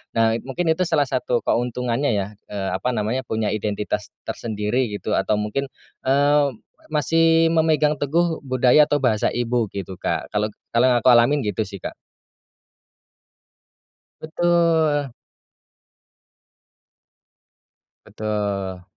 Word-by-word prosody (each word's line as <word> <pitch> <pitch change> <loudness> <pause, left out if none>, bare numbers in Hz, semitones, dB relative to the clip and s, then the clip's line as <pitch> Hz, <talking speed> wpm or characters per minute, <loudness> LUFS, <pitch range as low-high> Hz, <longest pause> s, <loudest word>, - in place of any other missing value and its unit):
Nah, 115 -1 +3 0.2
mungkin 165 +4 0
itu 175 +2 0
salah 155 -3 +2
satu 125 -1 -1
keuntungannya, 125 +2 0
ya, 100 -1 -1 0.2
eee, 100 -2 -3
apa 125 - -2
namanya, 110 +4 -1
punya 110 -2 -1
identitas 105 0 -3 0.2
tersendiri, 110 +2 -2
gitu, 105 - -5
atau 100 +2 +1
mungkin, 105 +7 -2 0.4
eee, 145 +1 +3 0.4
masih 165 +2 +3
memegang 155 -2 +2
teguh 160 +3 0
budaya 130 +2 +4
atau 145 - +1
bahasa 110 -5 +1
ibu, 120 -3 -1
gitu, 95 -1 -6
Kak. - - -3
Kalau 105 +1 0 0.2
kalau 120 +2 +5
yang 120 - +3
aku 125 - -1
alamin 120 +5 +5
gitu, 105 -4 -1
sih, 100 -1 -9
Kak. - - -7 2.3
Betul. 160 -4 +1 2.9
Betul. 100 -4 -3
125 Hz, 115 wpm, -22 LUFS, 105-150 Hz, 2.9 s, kalau